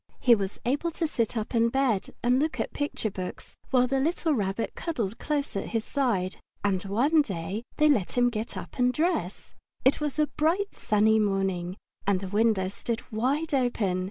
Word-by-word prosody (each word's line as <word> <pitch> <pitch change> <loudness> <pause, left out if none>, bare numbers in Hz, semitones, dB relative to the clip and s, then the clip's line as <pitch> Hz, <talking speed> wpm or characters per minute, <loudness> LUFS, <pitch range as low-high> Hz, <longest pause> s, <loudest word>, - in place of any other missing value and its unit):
He 245 - +6
was 200 -3 -1
able 285 +7 +1
to 335 - +1
sit 235 -7 -1
up 220 +3 -3
in 230 0 +3
bed 250 -6 +1 0.2
and 250 +2 +4
look 290 -3 -1
at - - -2
picture 290 -7 -2
books, 185 -1 -7
while 255 -1 +4
the 270 +1 0
little 320 +2 +1
Rabbit 205 -2 -1
cuddled 230 - -3
close 295 -5 -2
at 195 - -2
his 220 - -3
side. 215 -10 0 0.3
And 195 -3 +1
one 270 +11 +3
day, 195 - -4 0.2
they 305 - +5
let 240 -8 +2
him 245 0 +4
get 220 0 -4
up - - -8
and 250 0 +4
dress. 305 - -1 0.3
It 270 +3 +4
was 295 -1 -2
a 305 - +4
bright, 330 +7 0
sunny 215 +1 +3
morning, 195 -3 0 0.3
and 200 -2 +3
the 190 - -5
windows 205 -2 +2
stood 230 +1 -3
wide 275 +8 0
open. 230 -8 +1
235 Hz, 185 wpm, -27 LUFS, 200-280 Hz, 0.3 s, He